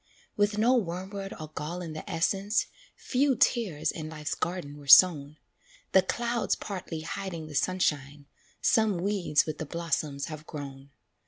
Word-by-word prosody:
"With 205 0 +1
no 230 +4 +4
wormwood 195 -1 -3
or 155 -1 -7
gall 155 +3 -5
in 160 -2 -6
the 155 - -8
essence, 195 +5 +1 0.3
Few 270 +1 +1
tares 210 - +1
in 155 -2 -6
life's 155 -1 -4
garden 170 -5 -4
were 145 -1 -13
sown; 150 -1 +7 0.5
The 190 - +6
clouds 235 +4 -1
partly 180 -5 -6
hiding 170 -1 -5
the 155 - -10
sunshine, 145 -4 -1 0.4
Some 220 -4 +3
weeds 185 -4 +1
with 155 -1 -5
the 160 - -3
blossoms 150 -4 -2
have 155 -1 -8
grown. 140 -2 -8
170 Hz, 150 wpm, -28 LUFS, 150-200 Hz, 0.5 s, sown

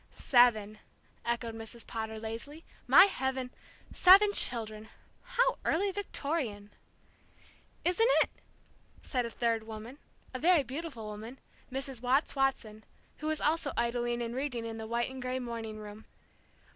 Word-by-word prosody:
"Seven!" 220 -4 +3 0.4
echoed 235 -1 -2
Mrs. 225 +1 -9
Potter, 220 -1 -5
lazily. 230 +8 -7 0.2
"My - - +9
heaven 265 -8 -2 0.4
seven 400 +3 +7
children! 220 - -1 0.3
How - - +1
early 390 +5 +1
Victorian!" 280 - -3 1.1
"Isn't 450 +7 +3
it?" - - -10 0.7
said 250 -3 -1
a - - -6
third 230 -1 0
woman, 225 +5 -8 0.3
a 255 - -4
very 335 -1 +4
beautiful 270 -3 -6
woman, 215 +4 -8 0.3
Mrs. 270 -2 -4
Watts 260 +5 +1
Watson, 230 -6 -1 0.3
who 305 - -5
was 310 0 -1
also 305 -3 +1
idling 240 0 0
and 230 0 -4
reading 250 -3 -3
in 225 0 -5
the 220 - -6
white 235 +2 -1
and 260 0 -8
gray 255 0 -2
morning 230 -3 -5
room. 210 0 -10
245 Hz, 135 wpm, -31 LUFS, 225-285 Hz, 1.1 s, My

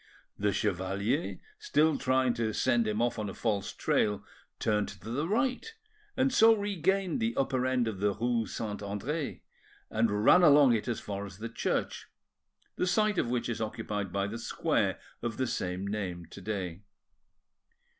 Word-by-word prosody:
The 105 0 +2
chevalier, 100 - -1 0.2
still 160 - +2
trying 130 -1 +2
to 110 -2 -1
send 120 -2 +2
him 105 +2 0
off 120 -1 0
on 105 -2 -2
a - - -8
false 105 -2 -1
trail, 105 -1 0 0.3
turned 105 -2 +1
to 110 - -9
the 145 +7 -1
right, 255 - 0 0.5
and 265 0 +2
so 225 -2 +7
regained 195 - 0
the 230 +1 0
upper 130 -1 +1
end 125 -2 +1
of 105 -4 -4
the 100 0 +1
rue 115 -1 0
Saint 105 -3 -4
Andre, 120 +10 -4 0.5
and 110 -1 +1
ran 180 - +7
along 145 -6 +7
it 110 +1 -1
as 120 - -1
far 100 -1 -5
as 95 -2 -9
the 115 +2 -5
church, 115 - -2 0.7
the 180 - +1
site 210 +1 +2
of - - 0
which 120 -1 -1
is 115 -1 -3
occupied 105 -3 -3
by 100 +1 0
the 110 +3 -5
square 115 - 0 0.2
of 115 -2 -3
the 130 - +1
same 90 -5 -3
name 95 -4 -3
to 100 - -10
day. 95 -3 -4
115 Hz, 170 wpm, -30 LUFS, 105-145 Hz, 0.7 s, so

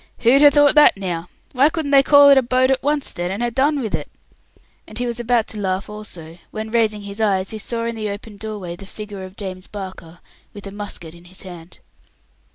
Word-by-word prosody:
"Who'd 245 +4 +5
ha' 295 - +9
thought 290 0 +5
that 300 -8 +6
now? 175 -3 -4 0.2
Why 275 +3 +4
couldn't 315 -3 -3
they 275 -1 +7
call 285 +1 +7
it 275 - +7
a - - +1
boat 255 +1 +2
at 265 - +1
once, 290 0 -1
then, 175 0 -3
and 200 +5 -3
ha' 240 -1 -2
done 285 +3 +2
with 220 -4 -4
it?" - - -3 0.8
and 215 - -10
he 245 - -1
was 240 -1 -3
about 240 -1 +1
to 215 - -6
laugh 190 +1 -2
also, 175 -6 -10
when, 220 0 -6
raising 220 -3 +1
his 200 +2 -7
eyes, 195 -2 +1
he 220 - -6
saw 230 +2 -3
in 235 - -2
the 215 -1 -3
open 205 +1 -8
doorway 205 -5 -6
the 195 +2 -12
figure 205 -1 -8
of 185 +1 -11
James 185 -2 -6
Barker, 185 -4 -9 0.4
with 205 - -9
a 195 - -7
musket 200 -5 -8
in 170 0 -16
his 185 +1 -12
hand. 175 -2 -11
215 Hz, 230 wpm, -20 LUFS, 190-245 Hz, 0.8 s, ha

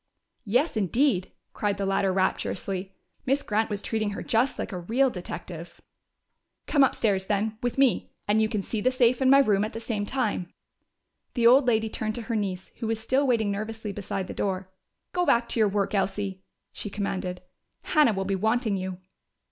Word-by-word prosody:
"Yes, 250 +10 +2
indeed!" 215 - +1 0.2
cried 205 -1 -1
the 200 - -1
latter 195 0 +1
rapturously. 190 0 -1 0.3
Miss 275 +2 +2
Grant 220 +1 0
was 205 -1 -3
treating 220 -2 -1
her - - -5
just 240 +4 +1
like - - -4
a 185 - -4
real 245 +9 +2
detective! 175 -2 -7 0.9
"Come 285 -3 +4
upstairs, 200 -7 +1
then, 215 +1 -1
with 245 0 -2
me, 270 -3 +3 0.2
and 210 +2 +3
you 215 - +2
can 210 -3 -2
see 220 +1 -3
the 255 - +3
safe 255 0 +2
and 260 - +4
my 275 - +8
room 210 -7 +4
at 215 - -3
the 225 - -4
same 215 -3 -3
time." 210 -9 -1 0.8
The 235 -2 +2
old 255 +3 +7
lady 220 -2 +3
turned 215 0 -3
to 235 - -5
her 230 0 -3
niece, 190 -3 -2
who 230 - -2
was 225 0 -1
still 260 +5 +1
waiting 220 -5 +2
nervously 215 +1 -4
beside 195 -1 -4
the - - -7
door. 190 -1 -2 0.4
"Go 360 - +1
back 235 -8 +3
to - - -1
your 215 -2 +4
work, 200 0 -1
Elsie," 195 -1 -1 0.3
she 205 - -5
commanded. 185 -3 -3 0.4
"Hannah 300 -8 +4
will 195 -1 -2
be 195 - -1
wanting 220 +1 +1
you." 185 -1 -4
215 Hz, 190 wpm, -26 LUFS, 195-235 Hz, 0.9 s, my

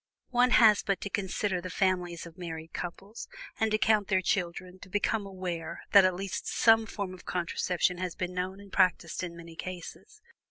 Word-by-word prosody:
One 250 0 +4
has 220 -4 +6
but 200 -2 -1
to 200 - -5
consider 190 -1 -1
the 185 - -6
families 180 -3 0
of 170 -1 -12
married 165 -3 -7
couples, 195 +5 -6 0.3
and 220 - +2
to 215 - +2
count 215 -2 +3
their 190 -2 +2
children, 180 -1 -2
to 185 - -12
become 205 +1 0
aware 180 -4 -5
that 200 -2 +8
at 185 -1 +2
least 195 0 -4
some 225 -1 +4
form 200 -4 -4
of 185 - -13
contraception 180 0 0
has 180 -2 -3
been 180 0 -3
known 185 +2 -3
and 200 -1 -14
practiced 180 -3 +2
in 170 -2 -6
many 170 -1 -11
cases. 185 - -8
185 Hz, 190 wpm, -29 LUFS, 175-200 Hz, 0.3 s, that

